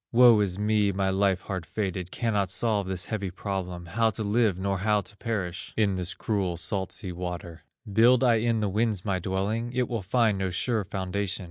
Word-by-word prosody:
"Woe 120 -2 +7
is 95 -3 0
me, 105 -1 +2
my 95 0 0
life 95 -1 +2
hard 95 -3 -4
fated! 95 +1 -3
Cannot 105 -3 0
solve 105 -1 0
this 90 -2 -2
heavy 100 -4 -3
problem, 90 -2 -4
How 110 +7 +1
to 110 0 -4
live 105 -2 +2
nor 95 0 -1
how 105 +1 +2
to 100 +2 -14
perish 95 -6 -4
In 105 -3 +3
this 90 0 -3
cruel 95 -5 -1
salt 95 +3 -2
sea 95 - -5
water. 85 -1 -6 0.3
Build 120 +4 +5
I 120 -3 +5
in 115 0 +1
the 105 - +1
winds 105 -1 0
my 95 -3 0
dwelling? 100 +6 -2
It 125 -1 +1
will 115 -3 -2
find 105 +1 +2
no 95 -1 0
sure 110 +4 0
foundation. 95 0 -3
100 Hz, 200 wpm, -27 LUFS, 95-110 Hz, 0.3 s, Woe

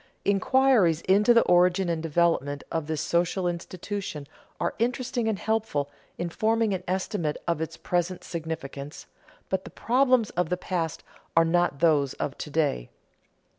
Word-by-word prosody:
Inquiries 200 - +3
into 205 +5 +4
the 235 -1 +6
origin 180 +1 +3
and 165 -2 -1
development 160 -3 +1
of 160 -2 -2
this 155 -2 -2
social 175 +2 0
institution 175 -2 -5 0.3
are 170 - -1
interesting 240 0 -1
and 220 -2 0
helpful 215 -11 -1 0.3
in 175 - -2
forming 220 +2 +1
an 185 -1 -3
estimate 185 -4 -1
of 170 -2 0
its 160 - -4
present 175 0 -1
significance, 155 -4 -6 0.4
but 190 0 -1
the - - -9
problems 255 -2 +2
of 175 -2 -1
the 180 - 0
past 170 -4 -3 0.3
are 165 - +7
not 175 -4 +1
those 145 -5 +3
of 140 - -3
to - - -5
day. 145 - 0
175 Hz, 150 wpm, -26 LUFS, 160-205 Hz, 0.4 s, are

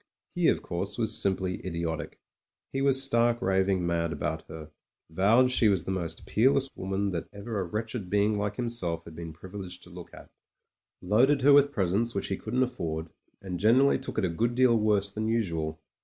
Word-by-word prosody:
He, - - +1
of - - +2
course, 95 +4 -4
was 110 -2 +3
simply 95 -1 0
idiotic: 85 -3 -4 0.5
he 135 - -1
was 135 -1 +5
stark, 120 -2 +2
raving 95 -2 +1
mad 85 -1 0
about 75 +1 -3
her; 80 -1 -10 0.4
vowed 115 +9 +4
she 125 -3 +4
was 95 -6 +2
the 95 - -4
most 90 -3 -4
peerless 135 +4 +2
woman 95 +1 -2
that 85 -2 -4
ever 100 +1 -5
a - - 0
wretched 110 +2 -5
being 105 +2 +2
like 105 0 -2
himself 100 -9 -2
had 80 - -11
been 85 -1 -7
privileged 90 +2 -9
to 90 - -13
look 90 -1 -11
at; - - -14 0.7
loaded 125 +9 +3
her 145 +1 +7
with 145 0 +5
presents 105 +1 0
which 100 - -2
he 95 - 0
couldn't 125 +4 -1
afford, 85 -10 -4 0.3
and 90 -2 -5
generally 125 +9 +4
took 130 - -7
it - - +2
a - - 0
good 115 +8 -1
deal 125 -2 +4
worse 105 -2 +1
than 110 +2 -3
usual. 80 -9 -1
100 Hz, 190 wpm, -28 LUFS, 85-115 Hz, 0.7 s, her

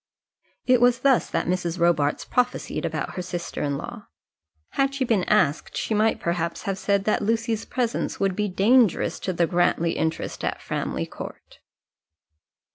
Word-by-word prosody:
It 250 -1 +4
was 245 0 +4
thus 270 -2 +3
that - - -1
Mrs. 175 -1 -1
Robarts 165 -4 +2
prophesied 250 0 -1
about - - -3
her 180 - -4
sister 175 -1 -5
in 145 -1 -1
law. - - -8 0.6
Had 275 0 0
she 270 -1 0
been 215 -6 +1
asked 170 -8 +1
she - - -1
might 215 +1 +2
perhaps 170 0 -2
have 195 -2 -2
said 200 0 +1
that 215 - +1
Lucy's 225 +1 0
presence 240 -3 -2
would 195 -2 +1
be 210 +1 0
dangerous 215 +2 +3
to 185 - -2
the 170 -1 +2
Grantly 170 -1 +1
interest 160 +1 -3
at - - -2
Framley - - -3
Court. - - -10
195 Hz, 160 wpm, -24 LUFS, 170-230 Hz, 0.6 s, It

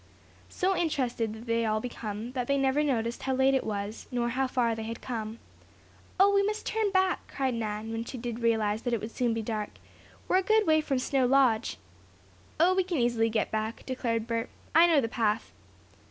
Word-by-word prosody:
So 380 +1 0
interested 255 -10 -1
did 220 +2 -9
they 230 0 +1
all 215 -1 +1
become 220 -1 -5
that 250 -2 -3
they 280 - +2
never 270 +1 +2
noticed 235 -5 -1
how 265 -1 -1
late 265 +1 +4
it 265 - +2
was, 205 0 -4
nor 240 -1 0
how 260 +2 0
far 240 -2 +1
they 225 - -5
had 225 +1 -5
come. 225 -2 -5 0.8
"Oh, 400 +1 +6
we 400 - +5
must 425 +2 -2
turn 440 -2 0
back!" 375 -1 +1
cried 265 -2 -1
Nan, 220 -1 -3
when 225 0 -3
she 255 - -7
did 235 -1 -5
realize 220 -2 +1
that 245 -1 -2
it 230 - +1
would 220 +3 -6
soon 240 -2 0
be 225 - -2
dark. 215 -1 -3 0.6
"We're 370 - +3
a - - +4
good 435 +3 +3
way 315 -1 +4
from 275 -3 -1
Snow 260 0 +1
Lodge." 250 -4 +3 0.8
"Oh, 350 +3 +5
we 375 0 +2
can 355 -2 -2
easily 235 -2 +2
get 220 -1 -1
back," 220 +1 -3
declared 230 -4 -1
Bert. 230 0 -2 0.2
"I 330 +2 +7
know 320 -4 +4
the 230 - -1
path." 225 -1 -1
240 Hz, 210 wpm, -29 LUFS, 225-275 Hz, 0.8 s, I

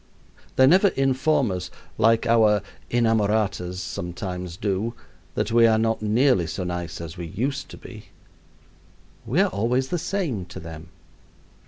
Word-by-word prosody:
They 130 - +6
never 185 +8 +6
inform 135 - +1
us, 90 -1 -4 0.3
like 115 +1 +4
our 110 -3 +4 0.3
inamoratas 105 -5 +1
sometimes 90 +1 -5
do, 105 +4 -2 0.4
that 110 - -1
we 115 0 +6
are 110 -1 +4
not 115 0 0
nearly 110 - +3
so 80 +3 -4
nice 90 -1 -4
as 85 +1 -7
we 85 -1 -5
used 135 - -3
to - - -10
be. 110 -2 -11 1.2
We - - +2
are - - +3
always 120 +6 0
the 175 - -1
same 155 - -2
to 90 - -9
them. 80 0 -9
110 Hz, 145 wpm, -24 LUFS, 90-120 Hz, 1.2 s, They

